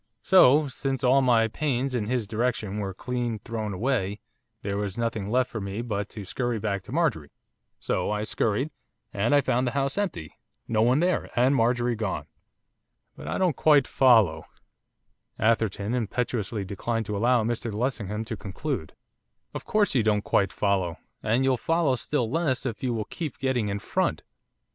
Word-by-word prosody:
So, 150 Hz, -5 st, +6 dB
since 135 Hz, -1 st, -3 dB
all 130 Hz, +2 st, +5 dB
my 120 Hz, -3 st, +4 dB
pains 135 Hz, +1 st, -1 dB
in 110 Hz, -4 st, -1 dB
his 125 Hz, -2 st, 0 dB
direction 110 Hz, -2 st, -1 dB
were 100 Hz, -2 st, -3 dB
clean 120 Hz, +3 st, -3 dB
thrown 110 Hz, 0 st, -4 dB
away, 105 Hz, -1 st, -1 dB, 0.4 s
there 100 Hz, 0 st, -2 dB
was 100 Hz, -1 st, -3 dB
nothing 110 Hz, -4 st, -2 dB
left 125 Hz, +2 st, +1 dB
for 110 Hz, -, -4 dB
me 100 Hz, +4 st, -4 dB
but 105 Hz, -4 st, -3 dB
to 105 Hz, -3 st, -8 dB
scurry 120 Hz, +4 st, -2 dB
back 100 Hz, -2 st, -2 dB
to -, -, -10 dB
Marjorie, 135 Hz, -, 0 dB, 0.5 s
so -, -, -1 dB
I 105 Hz, 0 st, -1 dB
scurried, 115 Hz, +6 st, 0 dB, 0.4 s
and 110 Hz, +8 st, +2 dB
I 145 Hz, -, +5 dB
found 125 Hz, -1 st, +1 dB
the 120 Hz, -, -2 dB
house 140 Hz, +7 st, 0 dB
empty, 130 Hz, -, -3 dB, 0.3 s
no 110 Hz, -2 st, +1 dB
one 125 Hz, +6 st, +4 dB
there, 180 Hz, +1 st, +1 dB
and 130 Hz, +3 st, +4 dB
Marjorie 120 Hz, 0 st, +2 dB
gone.' 105 Hz, -3 st, -3 dB, 0.9 s
'But, -, -, -10 dB
I -, -, -2 dB
don't 180 Hz, -6 st, +2 dB
quite 145 Hz, -2 st, +5 dB
follow 110 Hz, -, +4 dB, 0.5 s
' -, -, -50 dB
Atherton 110 Hz, -1 st, +1 dB
impetuously 115 Hz, -3 st, -2 dB
declined 110 Hz, +4 st, -2 dB
to 105 Hz, -, -3 dB
allow 120 Hz, +3 st, +3 dB
Mr 115 Hz, 0 st, -2 dB
Lessingham 105 Hz, -2 st, -2 dB
to 115 Hz, 0 st, -4 dB
conclude. 100 Hz, -, -4 dB, 0.6 s
'Of -, -, -6 dB
course 210 Hz, -5 st, +2 dB
you 130 Hz, -, +3 dB
don't 105 Hz, -1 st, +1 dB
quite 100 Hz, 0 st, +2 dB
follow, 95 Hz, -5 st, 0 dB, 0.2 s
and 115 Hz, +4 st, +1 dB
you'll 130 Hz, -1 st, +2 dB
follow 165 Hz, 0 st, +1 dB
still 125 Hz, -1 st, -1 dB
less 135 Hz, -1 st, 0 dB
if 115 Hz, -4 st, -3 dB
you 130 Hz, -, 0 dB
will 110 Hz, -3 st, -2 dB
keep 155 Hz, -1 st, -5 dB
getting 125 Hz, -6 st, 0 dB
in 100 Hz, -, -1 dB
front. -, -, -1 dB
115 Hz, 175 wpm, -26 LUFS, 105-130 Hz, 0.9 s, So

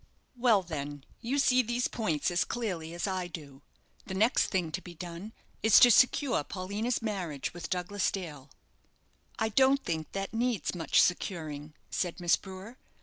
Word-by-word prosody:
"Well, 235 Hz, -5 st, +4 dB
then, 145 Hz, -4 st, -5 dB, 0.2 s
you 255 Hz, +5 st, -2 dB
see 255 Hz, -2 st, +4 dB
these 240 Hz, +1 st, -1 dB
points 170 Hz, -9 st, -1 dB
as 175 Hz, -, +2 dB
clearly 180 Hz, -9 st, -4 dB
as 175 Hz, -, -2 dB
I 185 Hz, -2 st, -2 dB
do 145 Hz, -5 st, -10 dB, 0.5 s
the 190 Hz, -, -4 dB
next 220 Hz, +5 st, +3 dB
thing 180 Hz, -5 st, -1 dB
to 185 Hz, -, -3 dB
be 175 Hz, -2 st, -11 dB
done 175 Hz, +5 st, -7 dB, 0.3 s
is 220 Hz, -1 st, +7 dB
to 245 Hz, -, +8 dB
secure 250 Hz, -, +4 dB
Paulina's 205 Hz, +8 st, -3 dB
marriage 180 Hz, -10 st, -3 dB
with 175 Hz, -1 st, -7 dB
Douglas 185 Hz, +2 st, 0 dB
Dale." 155 Hz, -8 st, -6 dB, 0.9 s
"I 220 Hz, -1 st, 0 dB
don't 270 Hz, +4 st, +4 dB
think 160 Hz, -2 st, -3 dB
that 195 Hz, +1 st, -4 dB
needs 235 Hz, -5 st, 0 dB
much 170 Hz, -3 st, +2 dB
securing," 155 Hz, -5 st, -2 dB, 0.2 s
said 180 Hz, 0 st, -2 dB
Miss 175 Hz, -1 st, +4 dB
Brewer. 195 Hz, +5 st, -10 dB
185 Hz, 160 wpm, -30 LUFS, 165-225 Hz, 0.9 s, to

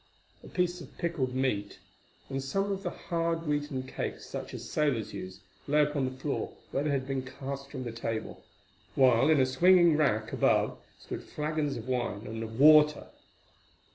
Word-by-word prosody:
A -, -, -11 dB
piece 180 Hz, -1 st, -1 dB
of -, -, -13 dB
pickled 155 Hz, -8 st, -2 dB
meat 105 Hz, -6 st, -1 dB, 0.5 s
and 135 Hz, 0 st, -3 dB
some 195 Hz, +9 st, -1 dB
of 195 Hz, 0 st, -2 dB
the -, -, -2 dB
hard 165 Hz, -1 st, -2 dB
wheaten 145 Hz, -3 st, -1 dB
cakes 130 Hz, -, -5 dB
such -, -, -6 dB
as -, -, -7 dB
sailors 140 Hz, -8 st, 0 dB
use, 95 Hz, -1 st, -7 dB, 0.3 s
lay 150 Hz, +1 st, +4 dB
upon 145 Hz, -2 st, 0 dB
the 130 Hz, 0 st, -5 dB
floor 140 Hz, +1 st, -3 dB, 0.2 s
where 135 Hz, -, 0 dB
they 150 Hz, -, 0 dB
had 135 Hz, -2 st, 0 dB
been 135 Hz, -1 st, -2 dB
cast 135 Hz, +1 st, -7 dB
from 130 Hz, -2 st, -6 dB
the 120 Hz, -, -4 dB
table, 115 Hz, -1 st, -4 dB, 0.5 s
while 130 Hz, 0 st, +5 dB
in 155 Hz, -2 st, +5 dB
a 130 Hz, -, +5 dB
swinging 170 Hz, +5 st, +5 dB
rack 115 Hz, -7 st, +1 dB
above -, -, +2 dB, 0.2 s
stood -, -, -7 dB
flagons 150 Hz, -1 st, -2 dB
of 115 Hz, -, -8 dB
wine 120 Hz, -5 st, -2 dB
and 110 Hz, +1 st, -5 dB
of 110 Hz, +1 st, -6 dB
water. 150 Hz, 0 st, +6 dB
140 Hz, 175 wpm, -30 LUFS, 125-155 Hz, 0.5 s, water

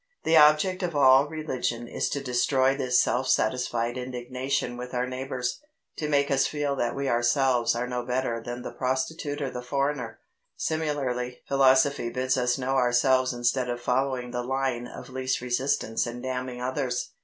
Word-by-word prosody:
The 165 Hz, -, +3 dB
object 155 Hz, +5 st, +5 dB
of 175 Hz, -4 st, -2 dB
all 135 Hz, 0 st, +6 dB
religion 130 Hz, -6 st, -3 dB
is -, -, -2 dB
to 140 Hz, -, -3 dB
destroy 130 Hz, +1 st, +2 dB
this 125 Hz, -2 st, +2 dB
self 130 Hz, +2 st, +1 dB
satisfied 120 Hz, +1 st, 0 dB
indignation 125 Hz, +1 st, -3 dB
with 125 Hz, +1 st, -7 dB
our 125 Hz, 0 st, +1 dB
neighbours 130 Hz, 0 st, -3 dB, 0.4 s
to 150 Hz, -, -3 dB
make 140 Hz, -1 st, +2 dB
us 135 Hz, -1 st, +3 dB
feel 145 Hz, -2 st, -2 dB
that 120 Hz, -1 st, -1 dB
we 140 Hz, 0 st, -2 dB
ourselves 120 Hz, 0 st, +2 dB
are 120 Hz, +1 st, -1 dB
no 125 Hz, 0 st, -3 dB
better 125 Hz, -2 st, -1 dB
than 120 Hz, +1 st, -6 dB
the -, -, -5 dB
prostitute 145 Hz, +3 st, -2 dB
or 135 Hz, -, -3 dB
the 125 Hz, -, -5 dB
foreigner. 135 Hz, -2 st, -2 dB, 0.4 s
Similarly 135 Hz, -6 st, -2 dB
philosophy 135 Hz, -1 st, +3 dB
bids 130 Hz, +2 st, 0 dB
us 125 Hz, -1 st, +1 dB
know 135 Hz, 0 st, -1 dB
ourselves 130 Hz, +1 st, +3 dB
instead 125 Hz, +1 st, 0 dB
of 120 Hz, 0 st, -2 dB
following 125 Hz, 0 st, -1 dB
the 125 Hz, -, -2 dB
line 130 Hz, -1 st, -2 dB
of -, -, -10 dB
least 130 Hz, 0 st, -1 dB
resistance 125 Hz, -1 st, -1 dB
and 120 Hz, +1 st, -7 dB
damning 125 Hz, -1 st, -4 dB
others. 125 Hz, 0 st, -2 dB
130 Hz, 165 wpm, -26 LUFS, 125-140 Hz, 0.4 s, all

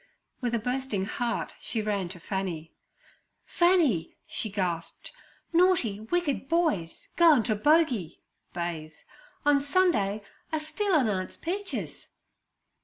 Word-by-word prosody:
With 240 Hz, -2 st, 0 dB
a -, -, +1 dB
bursting 250 Hz, -4 st, -2 dB
heart 235 Hz, +3 st, -2 dB
she 230 Hz, -, -3 dB
ran 205 Hz, -4 st, -1 dB
to 180 Hz, 0 st, -8 dB
Fanny. 175 Hz, -3 st, -4 dB, 0.7 s
'Fanny' 330 Hz, -, +2 dB
she 220 Hz, -, -3 dB
gasped, 175 Hz, -5 st, -3 dB, 0.4 s
'naughty, 335 Hz, -, +3 dB
wicked 285 Hz, +3 st, -1 dB
boys 315 Hz, -, 0 dB
goin' 320 Hz, -8 st, +6 dB
t' 215 Hz, -, +1 dB
bogey 245 Hz, -, +2 dB, 0.3 s
[bathe] 165 Hz, -3 st, -4 dB, 0.5 s
on 290 Hz, -1 st, +5 dB
Sunday 280 Hz, -, +2 dB, 0.3 s
are 315 Hz, -, 0 dB
stealin' 310 Hz, -, +1 dB
Aunt's 185 Hz, -3 st, -2 dB
peaches!' 390 Hz, +4 st, -4 dB
235 Hz, 110 wpm, -28 LUFS, 190-320 Hz, 0.7 s, goin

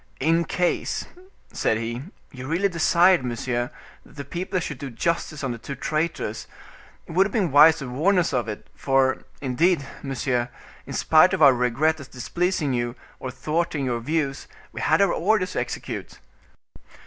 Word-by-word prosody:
"In 165 Hz, +4 st, +2 dB
case," 180 Hz, -1 st, -1 dB, 0.5 s
said 110 Hz, -, +1 dB
he, 115 Hz, +2 st, -4 dB, 0.3 s
"you 130 Hz, 0 st, -8 dB
really 175 Hz, +6 st, +1 dB
desired, 170 Hz, -1 st, +4 dB
monsieur, 120 Hz, 0 st, -2 dB, 0.3 s
that -, -, -19 dB
the 140 Hz, -1 st, -7 dB
people 180 Hz, +5 st, -3 dB
should 150 Hz, -6 st, -5 dB
do 140 Hz, -, -5 dB
justice 155 Hz, +4 st, -2 dB
on 135 Hz, -, -1 dB
the 120 Hz, -, -6 dB
two 140 Hz, -, -6 dB
traitors, 155 Hz, -6 st, -2 dB, 0.6 s
it -, -, -11 dB
would 190 Hz, +4 st, +4 dB
have -, -, -11 dB
been 195 Hz, -, 0 dB
wise 150 Hz, +3 st, +7 dB
to 135 Hz, -, -6 dB
warn 160 Hz, +11 st, +2 dB
us 175 Hz, -5 st, +1 dB
of 120 Hz, -3 st, 0 dB
it; 105 Hz, -1 st, -6 dB
for, 135 Hz, -1 st, +1 dB, 0.2 s
indeed, 145 Hz, +3 st, +1 dB, 0.2 s
monsieur, 125 Hz, -3 st, -1 dB, 0.4 s
in -, -, -6 dB
spite 180 Hz, +4 st, +5 dB
of 170 Hz, -, +2 dB
our 140 Hz, -2 st, +8 dB
regret 125 Hz, +6 st, +1 dB
at 140 Hz, -, -10 dB
displeasing 155 Hz, +3 st, -1 dB
you, 120 Hz, 0 st, -2 dB, 0.2 s
or 130 Hz, -, -5 dB
thwarting 155 Hz, +1 st, -2 dB
your 120 Hz, -2 st, -1 dB
views, 140 Hz, +2 st, -2 dB, 0.2 s
we -, -, -6 dB
had -, -, +3 dB
our 195 Hz, -, +2 dB
orders 200 Hz, +1 st, +1 dB
to -, -, -2 dB
execute." -, -, -5 dB
145 Hz, 170 wpm, -24 LUFS, 125-170 Hz, 0.6 s, our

